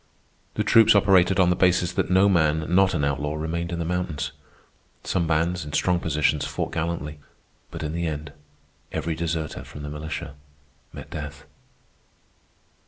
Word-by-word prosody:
The -, -, 0 dB
troops 115 Hz, -2 st, +6 dB
operated 95 Hz, -2 st, +4 dB
on 90 Hz, -1 st, +5 dB
the -, -, +2 dB
basis 90 Hz, -1 st, +2 dB
that -, -, -1 dB
no 95 Hz, +2 st, +5 dB
man 80 Hz, -4 st, +2 dB
not 95 Hz, 0 st, +4 dB
an 70 Hz, -3 st, +1 dB
outlaw 75 Hz, +2 st, -1 dB
remained 85 Hz, +2 st, -3 dB
in 85 Hz, -, -2 dB
the 85 Hz, -, -2 dB
mountains. 90 Hz, -3 st, -2 dB, 0.7 s
Some 85 Hz, -3 st, 0 dB
bands, 85 Hz, +2 st, 0 dB
in 75 Hz, 0 st, -8 dB
strong 90 Hz, +2 st, +2 dB
positions, 75 Hz, -2 st, +1 dB
fought -, -, -3 dB
gallantly, 80 Hz, -2 st, -3 dB, 0.5 s
but -, -, -7 dB
in 75 Hz, 0 st, -3 dB
the 85 Hz, 0 st, -1 dB
end 75 Hz, -2 st, -5 dB, 0.6 s
every 80 Hz, +1 st, -2 dB
deserter 80 Hz, -1 st, -3 dB
from 75 Hz, -, -10 dB
the 75 Hz, -, -5 dB
militia 75 Hz, 0 st, -5 dB, 0.6 s
met -, -, -10 dB
death. 75 Hz, -1 st, -7 dB
80 Hz, 160 wpm, -24 LUFS, 75-90 Hz, 0.7 s, troops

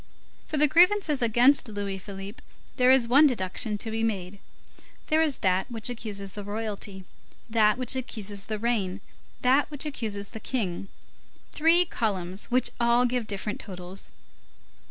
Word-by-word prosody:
For 310 Hz, -, -3 dB
the 300 Hz, +1 st, +5 dB
grievances 345 Hz, -2 st, +4 dB
against 245 Hz, +4 st, +4 dB
Louis 200 Hz, -2 st, -4 dB
Philippe, 195 Hz, +2 st, -9 dB, 0.4 s
there 250 Hz, -1 st, +5 dB
is 260 Hz, -3 st, +5 dB
one 280 Hz, +6 st, +6 dB
deduction 210 Hz, -2 st, -1 dB
to 225 Hz, +2 st, -5 dB
be 225 Hz, 0 st, -2 dB
made; 200 Hz, -3 st, -3 dB, 0.7 s
there 315 Hz, 0 st, +3 dB
is 305 Hz, -4 st, +2 dB
that 185 Hz, +4 st, +1 dB
which 235 Hz, +1 st, -3 dB
accuses 200 Hz, -5 st, -6 dB
royalty, 205 Hz, -1 st, -5 dB, 0.4 s
that 220 Hz, -1 st, +3 dB
which 255 Hz, 0 st, 0 dB
accuses 205 Hz, -6 st, -5 dB
the 215 Hz, -, -2 dB
reign, 205 Hz, -4 st, -1 dB, 0.4 s
that 265 Hz, +3 st, +3 dB
which 295 Hz, -1 st, -2 dB
accuses 215 Hz, -8 st, -4 dB
the 220 Hz, -, -8 dB
King; 195 Hz, -7 st, -3 dB, 0.7 s
three 330 Hz, +3 st, +4 dB
columns 195 Hz, -, -3 dB
which 250 Hz, 0 st, +2 dB
all 235 Hz, +1 st, +3 dB
give 245 Hz, -2 st, -1 dB
different 205 Hz, +1 st, -4 dB
totals. 185 Hz, -1 st, -9 dB
225 Hz, 145 wpm, -26 LUFS, 200-255 Hz, 0.7 s, one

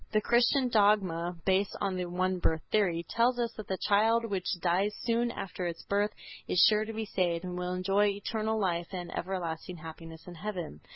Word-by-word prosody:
The 215 Hz, -, +5 dB
Christian 245 Hz, +4 st, +3 dB
dogma, 195 Hz, -6 st, +2 dB
based 190 Hz, +1 st, +1 dB
on 195 Hz, -1 st, -1 dB
the 180 Hz, -1 st, -2 dB
one 185 Hz, +1 st, -1 dB
birth 160 Hz, -2 st, 0 dB
theory, 175 Hz, -6 st, +1 dB
tells 240 Hz, +2 st, +2 dB
us 235 Hz, -2 st, -1 dB
that 215 Hz, -, -7 dB
the 190 Hz, -, -2 dB
child 225 Hz, +4 st, +3 dB
which 190 Hz, -4 st, -2 dB
dies 185 Hz, +5 st, +1 dB
soon 235 Hz, 0 st, +1 dB
after 185 Hz, -5 st, -4 dB
its 170 Hz, -1 st, -5 dB
birth 205 Hz, +1 st, +1 dB, 0.4 s
is -, -, -1 dB
sure 215 Hz, 0 st, +3 dB
to 225 Hz, -, -5 dB
be 220 Hz, 0 st, -3 dB
saved 175 Hz, -4 st, 0 dB
and 180 Hz, -1 st, -4 dB
will 180 Hz, 0 st, -2 dB
enjoy 195 Hz, +3 st, +2 dB
eternal 215 Hz, +2 st, -1 dB
life 175 Hz, -3 st, 0 dB
and 175 Hz, -2 st, -5 dB
everlasting 175 Hz, -1 st, -4 dB
happiness 165 Hz, 0 st, -10 dB
in 180 Hz, -, -9 dB
heaven. 175 Hz, -, -5 dB
190 Hz, 190 wpm, -30 LUFS, 175-215 Hz, 0.4 s, The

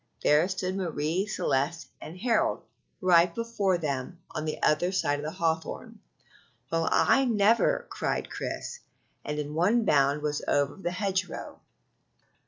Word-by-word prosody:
there 150 Hz, +4 st, +4 dB
stood 185 Hz, 0 st, -3 dB
Marie 175 Hz, +1 st, -1 dB
Celeste 150 Hz, -3 st, -1 dB
and 165 Hz, +4 st, -9 dB
Harold 230 Hz, +3 st, +1 dB, 0.4 s
right 175 Hz, -2 st, +4 dB
before 230 Hz, -5 st, 0 dB
them 145 Hz, +1 st, -3 dB
on 155 Hz, -, -4 dB
the 155 Hz, -, -3 dB
other 175 Hz, +4 st, +3 dB
side 145 Hz, -6 st, 0 dB
of -, -, -6 dB
the -, -, -2 dB
hawthorn. 160 Hz, -1 st, -2 dB, 0.7 s
"Well, 165 Hz, 0 st, +1 dB
I 270 Hz, 0 st, +4 dB
never!" 230 Hz, -, +3 dB
cried -, -, -2 dB
Chris, 485 Hz, -, -5 dB, 0.4 s
and 150 Hz, 0 st, -4 dB
in 150 Hz, 0 st, -4 dB
one 205 Hz, +9 st, +2 dB
bound 145 Hz, -2 st, +3 dB
was 150 Hz, -1 st, -1 dB
over 145 Hz, 0 st, +1 dB
the 195 Hz, -3 st, -3 dB
hedgerow. 185 Hz, +1 st, -3 dB
170 Hz, 140 wpm, -28 LUFS, 150-195 Hz, 0.7 s, there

